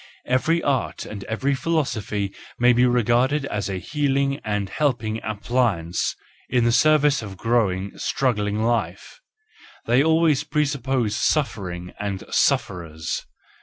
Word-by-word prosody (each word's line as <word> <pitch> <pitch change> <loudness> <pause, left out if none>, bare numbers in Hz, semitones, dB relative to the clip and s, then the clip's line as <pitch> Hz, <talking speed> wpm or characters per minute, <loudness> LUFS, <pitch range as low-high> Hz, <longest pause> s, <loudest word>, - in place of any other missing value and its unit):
Every 160 +7 +1
art 135 -4 -1
and 100 -2 -7
every 135 +5 -1
philosophy 115 - -1 0.2
may 125 +1 +5
be 125 +1 +4
regarded 125 +4 +2
as 105 -7 -3
a 95 - -2
healing 140 - 0
and 105 -2 -1
helping 120 -3 -1
appli¬ 110 -1 0
ance 85 +1 -2 0.3
in 125 -2 +2
the 120 - +3
service 150 +2 +4
of 100 -3 -8
growing, 100 -5 0
struggling 105 -5 0
life: 110 - -2 0.7
they 125 +4 +4
always 160 -2 +3
presuppose 135 -7 0
suffering 95 - -1
and 100 -2 -3
sufferers. 80 -3 0
120 Hz, 125 wpm, -23 LUFS, 100-140 Hz, 0.7 s, may